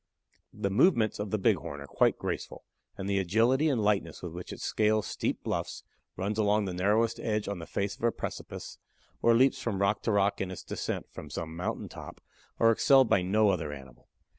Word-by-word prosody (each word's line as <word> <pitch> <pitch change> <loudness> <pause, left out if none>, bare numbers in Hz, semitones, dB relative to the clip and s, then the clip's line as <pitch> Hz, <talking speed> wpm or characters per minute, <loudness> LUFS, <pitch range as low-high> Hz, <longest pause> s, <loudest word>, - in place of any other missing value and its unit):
The 100 - -2
movements 115 - +3
of 105 0 -3
the 110 - 0
Bighorn 75 -6 0
are 70 - -8
quite - - +2
graceful, - - -5 0.3
and 95 - -4
the 100 -1 +1
agility 115 - +3
and 130 -5 +1
lightness 100 -7 0
with 90 - -5
which 90 +1 -7
it - - -8
scales 110 -1 +1
steep - - -3
bluffs, - - -3 0.3
runs 100 +4 -2
along 105 0 +2
the 95 - -3
narrowest 105 +5 +1
edge 105 -2 -1
on 100 -3 -3
the 80 - -8
face 100 0 -2
of - - -21
a 120 - +4
precipice, - - -7 0.4
or 115 0 +5
leaps 130 +2 +3
from 110 -6 -2
rock 100 +1 +1
to 115 - 0
rock 100 -1 +2
in 95 - -2
its 95 - -7
descent - - -4
from - - -9
some 80 -1 -5
mountain 90 +2 -3
top, - - -10 0.4
are 115 - +6
excelled 130 +3 +5
by 95 - +4
no 105 +4 +3
other 80 -6 -1
animal. 65 -4 -12
100 Hz, 205 wpm, -29 LUFS, 90-110 Hz, 0.4 s, are